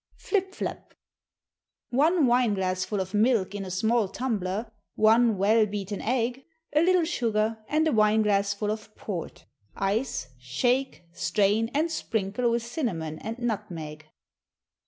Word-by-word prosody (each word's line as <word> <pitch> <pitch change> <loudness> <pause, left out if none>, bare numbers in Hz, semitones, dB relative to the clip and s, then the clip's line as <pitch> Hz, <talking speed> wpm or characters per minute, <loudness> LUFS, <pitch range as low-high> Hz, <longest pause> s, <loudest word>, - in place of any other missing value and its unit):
Flip 385 -2 -1
Flap. - - -5 1.0
One 305 +5 +3
wine 240 -3 +3
glassful 185 +1 -1
of 190 +1 -4
milk 210 -3 +2
in 205 -1 -4
a 190 - -6
small 220 +4 +1
tumbler, 215 -1 -3 0.2
one 225 0 +4
well 215 +3 +4
beaten 200 -1 -4
egg, 250 +2 -1 0.3
a 300 - +4
little 360 0 +4
sugar, 225 -8 0
and 310 +1 +2
a - - +2
wine 215 -2 +4
glassful 200 0 +1
of 215 0 -7
port. 180 -6 -6 0.3
Ice, 195 - -1
shake, 245 - 0
strain, 205 +5 +1
and 320 +3 +1
sprinkle 220 -4 -1
with 235 0 0
cinnamon 175 - -3
and 225 +2 -5
nutmeg. 175 -10 -4
215 Hz, 135 wpm, -27 LUFS, 195-245 Hz, 1.0 s, one